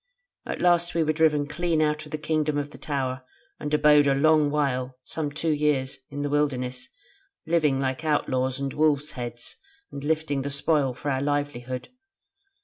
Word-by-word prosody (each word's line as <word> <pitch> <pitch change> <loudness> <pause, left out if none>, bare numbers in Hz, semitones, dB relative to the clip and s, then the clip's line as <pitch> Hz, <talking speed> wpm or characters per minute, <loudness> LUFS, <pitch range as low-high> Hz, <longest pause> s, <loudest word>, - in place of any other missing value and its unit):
At - - -4
last 175 -1 +3
we 165 - +3
were 155 0 +1
driven 150 -2 +3
clean 170 +1 0
out 155 0 +1
of - - -15
the 155 - -2
Kingdom 150 -1 0
of 145 0 -3
the - - -13
Tower, 130 -3 -2 0.4
and 150 - -4
abode 150 -1 +5
a 135 - +3
long 155 +1 +4
while, 130 -3 -1
some 155 +1 -3
two 155 +2 -1
years, 145 -3 0
in 145 0 -4
the 145 - -1
wilderness, 130 -4 -1 0.6
living 155 -5 +2
like 130 +3 -2
outlaws 130 -4 0
and 140 -1 -3
wolves' 150 -1 +2
heads, 120 -1 -7 0.3
and 140 - -7
lifting 150 -2 0
the 140 - -3
spoil 145 -2 +1
for 145 +3 -3
our 130 0 0
livelihood. 140 -3 -2
145 Hz, 175 wpm, -26 LUFS, 135-155 Hz, 0.6 s, abode